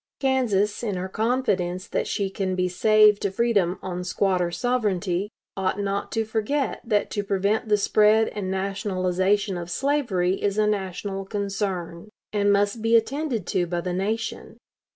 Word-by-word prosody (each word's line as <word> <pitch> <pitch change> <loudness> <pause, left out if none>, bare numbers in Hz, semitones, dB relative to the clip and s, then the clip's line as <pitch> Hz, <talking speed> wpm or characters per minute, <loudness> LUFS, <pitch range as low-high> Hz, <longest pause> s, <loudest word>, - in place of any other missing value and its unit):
Kansas, 235 -7 +1
in 210 -5 -2
her 180 +1 -3
confidence 190 -5 -1
that - - -2
she 195 -2 -1
can 190 -1 -2
be 180 0 +1
saved 210 +3 +4
to 200 - 0
freedom 195 -4 +1
on 180 -1 -4
'squatter 180 -1 +1
sovereignty,' 200 -2 -1 0.3
ought 190 +1 -1
not 200 0 -2
to 225 -1 0
forget 225 +6 -1
that 210 -4 0
to 205 - -1
prevent 200 +3 0
the 210 - +4
spread 215 +2 +4
and 200 -3 -4
nationalization 190 0 0
of 170 0 -7
slavery 200 -8 0
is 200 0 0
a 215 - +3
national 195 -1 -2
concern, 195 -3 -3 0.2
and 205 -1 +3
must 205 +2 +1
be 225 +1 +3
attended 240 - 0
to 175 0 0
by 175 0 -2
the 180 +1 -3
nation. 215 +5 -3
200 Hz, 155 wpm, -24 LUFS, 185-215 Hz, 0.3 s, saved